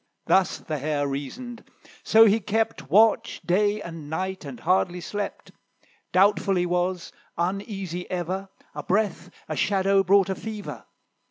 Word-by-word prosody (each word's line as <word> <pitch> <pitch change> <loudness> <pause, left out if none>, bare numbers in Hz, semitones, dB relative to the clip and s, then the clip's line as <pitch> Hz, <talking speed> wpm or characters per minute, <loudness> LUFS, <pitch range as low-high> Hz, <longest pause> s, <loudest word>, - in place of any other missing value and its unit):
Thus 190 -1 +3
the 155 -2 -5
Hare 145 0 -1
reasoned; 225 - -6 0.4
so 225 +1 +7
he 215 +1 +4
kept 210 -8 -2
Watch 215 +7 +4
day 205 +3 +1
and 165 -3 -8
night, 185 +2 -3
and 135 -4 -8
hardly 180 0 +1
slept; 205 +4 -5 0.6
Doubtful 195 +1 +3
he 180 -1 +1
was, 180 0 -1 0.3
uneasy 185 0 -3
ever; 185 +2 -3 0.2
A - - -5
breath, 205 0 -1 0.2
a 155 - -3
shadow, 195 +2 +2
brought 195 +1 +4
a - - +1
fever. 215 +1 -7
190 Hz, 140 wpm, -25 LUFS, 170-205 Hz, 0.6 s, so